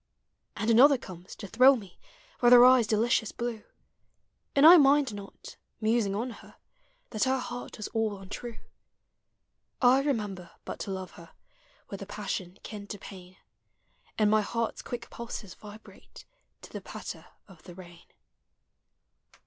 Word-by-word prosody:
And 225 Hz, +1 st, 0 dB
another 270 Hz, +5 st, +6 dB
comes, 185 Hz, -5 st, -11 dB
to 210 Hz, -, -9 dB
thrill 255 Hz, +6 st, +6 dB
me 195 Hz, -7 st, -11 dB, 0.4 s
With 240 Hz, 0 st, +6 dB
her 245 Hz, 0 st, +9 dB
eyes' 255 Hz, -3 st, +5 dB
delicious 220 Hz, 0 st, +1 dB
blue; 235 Hz, -2 st, -5 dB, 0.9 s
And 280 Hz, +1 st, +5 dB
I 345 Hz, +3 st, +11 dB
mind 280 Hz, -4 st, +4 dB
not, 200 Hz, -1 st, -11 dB, 0.2 s
musing 220 Hz, -2 st, +1 dB
on 240 Hz, +4 st, -3 dB
her, -, -, -15 dB, 0.6 s
That 215 Hz, -, 0 dB
her 260 Hz, 0 st, +1 dB
heart 245 Hz, -1 st, -7 dB
was 215 Hz, -, -5 dB
all 220 Hz, -2 st, -1 dB
untrue: 205 Hz, +4 st, -8 dB, 1.2 s
I 255 Hz, +1 st, +5 dB
remember 205 Hz, -11 st, -3 dB
but -, -, -7 dB
to 195 Hz, -, -5 dB
love 190 Hz, -1 st, -6 dB
her 170 Hz, -1 st, -15 dB, 0.6 s
With 200 Hz, -, -7 dB
a 195 Hz, -, -7 dB
passion 190 Hz, -3 st, -5 dB
kin 205 Hz, -2 st, -8 dB
to 205 Hz, -, -7 dB
pain. 185 Hz, -2 st, -12 dB, 0.8 s
And 210 Hz, -1 st, +3 dB
my 215 Hz, 0 st, +4 dB
heart's 230 Hz, +2 st, -3 dB
quick 240 Hz, -1 st, -7 dB
pulses 230 Hz, -5 st, -8 dB
vibrate 210 Hz, +2 st, -14 dB, 0.4 s
To -, -, -13 dB
the -, -, -6 dB
patter -, -, -9 dB, 0.2 s
of 185 Hz, -6 st, -17 dB
the 175 Hz, -1 st, -13 dB
rain. 175 Hz, -2 st, -14 dB
215 Hz, 150 wpm, -28 LUFS, 195-245 Hz, 1.2 s, I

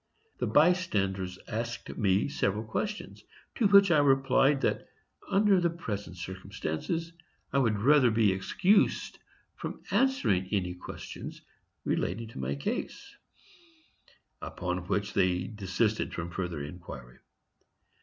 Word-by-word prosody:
The -, -, 0 dB
bystanders 100 Hz, -, +2 dB
asked 115 Hz, +2 st, -4 dB
me 100 Hz, -2 st, +2 dB
several 105 Hz, -6 st, -1 dB
questions, 210 Hz, -, -4 dB, 0.3 s
to 225 Hz, -, +3 dB
which 200 Hz, -2 st, +7 dB
I 155 Hz, -, +5 dB
replied 135 Hz, 0 st, +4 dB
that -, -, 0 dB, 0.4 s
under 200 Hz, -2 st, +4 dB
the 170 Hz, -, +3 dB
present 105 Hz, -, -5 dB
circumstances 95 Hz, -, -4 dB, 0.4 s
I 140 Hz, -, +4 dB
would 115 Hz, -5 st, +2 dB
rather 130 Hz, +3 st, +5 dB
be 110 Hz, -2 st, +3 dB
excused 180 Hz, -, +1 dB, 0.3 s
from -, -, -7 dB
answering 165 Hz, -, +2 dB
any 90 Hz, -3 st, 0 dB
questions 90 Hz, -, -8 dB, 0.4 s
relating 110 Hz, +6 st, -1 dB
to 115 Hz, -, -9 dB
my 65 Hz, +2 st, -2 dB
case; 70 Hz, -, -4 dB, 1.3 s
upon 90 Hz, 0 st, -4 dB
which 105 Hz, +2 st, -1 dB
they 90 Hz, -2 st, +2 dB
desisted 105 Hz, +1 st, -1 dB
from 85 Hz, 0 st, -4 dB
further 85 Hz, -5 st, -3 dB
inquiry. 70 Hz, -6 st, -10 dB
105 Hz, 115 wpm, -29 LUFS, 90-150 Hz, 1.3 s, which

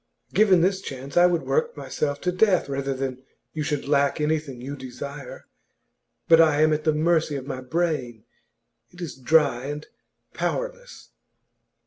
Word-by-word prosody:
Given 195 Hz, -5 st, +5 dB
this 190 Hz, +2 st, +1 dB
chance, 135 Hz, -3 st, -8 dB
I 175 Hz, 0 st, +7 dB
would 175 Hz, -2 st, 0 dB
work 475 Hz, 0 st, 0 dB
myself 145 Hz, -1 st, -2 dB
to 180 Hz, -, 0 dB
death 185 Hz, -2 st, +3 dB
rather 135 Hz, -1 st, -2 dB
than 130 Hz, -1 st, -4 dB, 0.3 s
you 155 Hz, -, -3 dB
should 150 Hz, -2 st, -2 dB
lack 140 Hz, 0 st, +2 dB
anything 150 Hz, -4 st, -1 dB
you 135 Hz, +4 st, -6 dB
desire. 140 Hz, +1 st, -8 dB, 0.8 s
But 165 Hz, 0 st, +7 dB
I 155 Hz, -2 st, +4 dB
am 155 Hz, 0 st, +4 dB
at 150 Hz, 0 st, -2 dB
the 155 Hz, -, +4 dB
mercy 160 Hz, -1 st, +2 dB
of 135 Hz, -2 st, -5 dB
my 130 Hz, -2 st, -5 dB
brain; 130 Hz, -6 st, -2 dB, 0.7 s
it 180 Hz, -, -17 dB
is 170 Hz, -5 st, -5 dB
dry 135 Hz, -2 st, +2 dB
and 145 Hz, +1 st, -5 dB, 0.5 s
powerless. -, -, -4 dB
150 Hz, 155 wpm, -24 LUFS, 135-175 Hz, 0.8 s, I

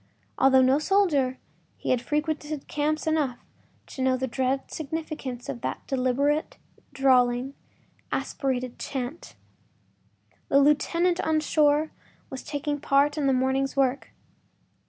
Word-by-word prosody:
Although 265 Hz, -1 st, +6 dB
no 265 Hz, +3 st, +4 dB
soldier, 305 Hz, -8 st, +2 dB, 0.4 s
he -, -, -2 dB
had 250 Hz, -2 st, +2 dB
frequented 300 Hz, +1 st, -3 dB
camps 305 Hz, +1 st, -1 dB
enough 300 Hz, -6 st, 0 dB, 0.5 s
to 265 Hz, -, -8 dB
know 260 Hz, 0 st, +2 dB
the 260 Hz, -, -1 dB
dread 260 Hz, +1 st, -1 dB
significance 305 Hz, -5 st, -5 dB
of 235 Hz, -, -5 dB
that -, -, -4 dB
deliberate, 275 Hz, +3 st, 0 dB, 0.3 s
drawling, 260 Hz, -1 st, +2 dB, 0.6 s
aspirated 255 Hz, -3 st, -2 dB
chant; 270 Hz, +4 st, -5 dB, 1.1 s
the 275 Hz, -, +4 dB
lieutenant 335 Hz, +5 st, +2 dB
on 315 Hz, 0 st, +1 dB
shore 300 Hz, 0 st, +2 dB, 0.4 s
was 265 Hz, -, -5 dB
taking 290 Hz, 0 st, -3 dB
a -, -, -13 dB
part 280 Hz, +1 st, +2 dB
in 295 Hz, -3 st, 0 dB
the -, -, +4 dB
morning’s 265 Hz, +1 st, 0 dB
work. 270 Hz, 0 st, +1 dB
275 Hz, 125 wpm, -26 LUFS, 260-300 Hz, 1.1 s, Although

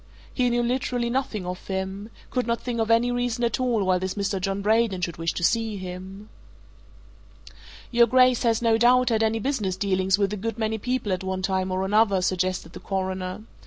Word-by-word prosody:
He 250 Hz, -2 st, +1 dB
knew 240 Hz, 0 st, +1 dB
literally 245 Hz, -1 st, -1 dB
nothing 235 Hz, -7 st, -2 dB
of 180 Hz, +1 st, -6 dB
him 190 Hz, +2 st, -4 dB, 0.2 s
could 250 Hz, -2 st, -1 dB
not 235 Hz, 0 st, 0 dB
think 240 Hz, -2 st, -3 dB
of 225 Hz, 0 st, 0 dB
any 230 Hz, +2 st, +3 dB
reason 245 Hz, 0 st, -1 dB
at 235 Hz, 0 st, 0 dB
all 240 Hz, -5 st, +1 dB
why 185 Hz, -1 st, +2 dB
this 185 Hz, 0 st, -3 dB
Mr. 200 Hz, -1 st, -2 dB
John 195 Hz, +1 st, -2 dB
Braden 215 Hz, -3 st, +2 dB
should 170 Hz, -2 st, -3 dB
wish 165 Hz, 0 st, -1 dB
to -, -, -4 dB
see 225 Hz, +2 st, +1 dB
him. 185 Hz, +2 st, -8 dB, 1.6 s
"Your 235 Hz, -1 st, +5 dB
Grace 255 Hz, 0 st, +4 dB
has, 230 Hz, -1 st, +1 dB
no 225 Hz, -1 st, +3 dB
doubt, 250 Hz, +2 st, +5 dB
had 225 Hz, -1 st, +1 dB
business 220 Hz, -9 st, -1 dB
dealings 190 Hz, -1 st, +1 dB
with 200 Hz, 0 st, 0 dB
a -, -, -3 dB
good 225 Hz, +2 st, -4 dB
many 220 Hz, 0 st, -1 dB
people 245 Hz, -2 st, -2 dB
at 185 Hz, -, -3 dB
one 190 Hz, 0 st, -3 dB
time 190 Hz, -1 st, 0 dB
or 185 Hz, +1 st, -1 dB
another," 200 Hz, -2 st, +3 dB
suggested 185 Hz, -2 st, -1 dB
the -, -, -8 dB
Coroner. 190 Hz, 0 st, -3 dB
210 Hz, 200 wpm, -25 LUFS, 190-235 Hz, 1.6 s, Your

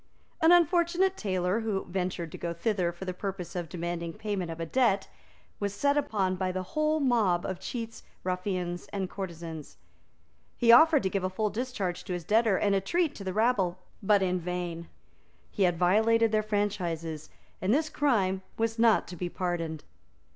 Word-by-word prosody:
An 325 Hz, +1 st, +6 dB
unfortunate 350 Hz, +2 st, +4 dB
tailor, 185 Hz, -, 0 dB
who 215 Hz, -4 st, -2 dB
ventured 180 Hz, -2 st, -3 dB
to -, -, -7 dB
go 170 Hz, -1 st, -3 dB
thither 180 Hz, -1 st, 0 dB
for 175 Hz, +2 st, -9 dB
the 185 Hz, -, -3 dB
purpose 185 Hz, -1 st, -5 dB
of 175 Hz, -2 st, -3 dB
demanding 170 Hz, -1 st, -4 dB
payment 200 Hz, -4 st, -3 dB
of 165 Hz, 0 st, -6 dB
a 165 Hz, -, -2 dB
debt, 200 Hz, -1 st, +2 dB, 0.5 s
was 200 Hz, -1 st, -2 dB
set 280 Hz, +5 st, +2 dB
upon 195 Hz, -10 st, 0 dB
by 185 Hz, 0 st, -1 dB
the 185 Hz, 0 st, -3 dB
whole 305 Hz, 0 st, +2 dB
mob 220 Hz, -, +2 dB
of 185 Hz, -2 st, -4 dB
cheats, 230 Hz, -2 st, -6 dB, 0.2 s
ruffians 180 Hz, -1 st, -2 dB
and 190 Hz, -2 st, -3 dB
courtesans. 170 Hz, -5 st, -7 dB, 0.8 s
He 235 Hz, -2 st, +5 dB
offered 305 Hz, +4 st, +7 dB
to 190 Hz, -, +1 dB
give 195 Hz, -2 st, -1 dB
a 185 Hz, -, 0 dB
full 210 Hz, +3 st, -1 dB
discharge 210 Hz, -6 st, -3 dB
to 180 Hz, -, -3 dB
his 175 Hz, -1 st, -4 dB
debtor 220 Hz, -2 st, +3 dB
and 200 Hz, -1 st, +2 dB
a 195 Hz, -, +2 dB
treat 335 Hz, -, 0 dB
to 200 Hz, -, -9 dB
the 190 Hz, -, -2 dB
rabble, 200 Hz, -4 st, +1 dB, 0.2 s
but 205 Hz, -1 st, +3 dB
in 185 Hz, -1 st, 0 dB
vain. 175 Hz, -1 st, -4 dB, 0.6 s
He 205 Hz, -, -5 dB
had 175 Hz, -2 st, +1 dB
violated 220 Hz, +5 st, +3 dB
their 215 Hz, -1 st, +3 dB
franchises; 175 Hz, -7 st, -2 dB, 0.3 s
and 185 Hz, -, +1 dB
this 305 Hz, +5 st, +2 dB
crime 210 Hz, -12 st, +1 dB, 0.2 s
was 225 Hz, 0 st, -1 dB
not 225 Hz, -2 st, +4 dB
to 180 Hz, -, -7 dB
be 175 Hz, +1 st, -3 dB
pardoned. 170 Hz, -4 st, -3 dB
195 Hz, 180 wpm, -29 LUFS, 180-225 Hz, 0.8 s, offered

